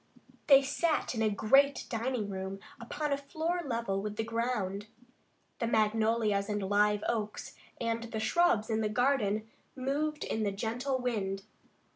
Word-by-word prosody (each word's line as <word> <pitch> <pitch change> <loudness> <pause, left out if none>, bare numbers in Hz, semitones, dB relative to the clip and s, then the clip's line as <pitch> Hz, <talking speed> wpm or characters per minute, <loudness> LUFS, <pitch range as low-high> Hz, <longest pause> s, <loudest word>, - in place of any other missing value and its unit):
They 275 -1 +8
sat 310 +3 0
in 225 - -2
a 220 - +3
great 270 +8 +3
dining 230 -1 -2
room 190 0 -5 0.2
upon 290 +5 -2
a - - +1
floor 320 +5 -2
level 230 -8 -1
with 210 0 -4
the 225 - -1
ground. 220 -3 -2 0.7
The 230 - 0
magnolias 220 -2 +2
and 205 -1 -1
live 205 +1 +2
oaks 215 -3 -3 0.3
and 230 0 -1
the 225 -1 -4
shrubs 220 -2 +2
in 220 0 +1
the 215 - 0
garden 220 -3 +1 0.3
moved 290 +3 -1
in 220 - -2
the 205 -2 +1
gentle 245 +6 -2
wind. 200 -6 -2
225 Hz, 150 wpm, -31 LUFS, 210-260 Hz, 0.7 s, They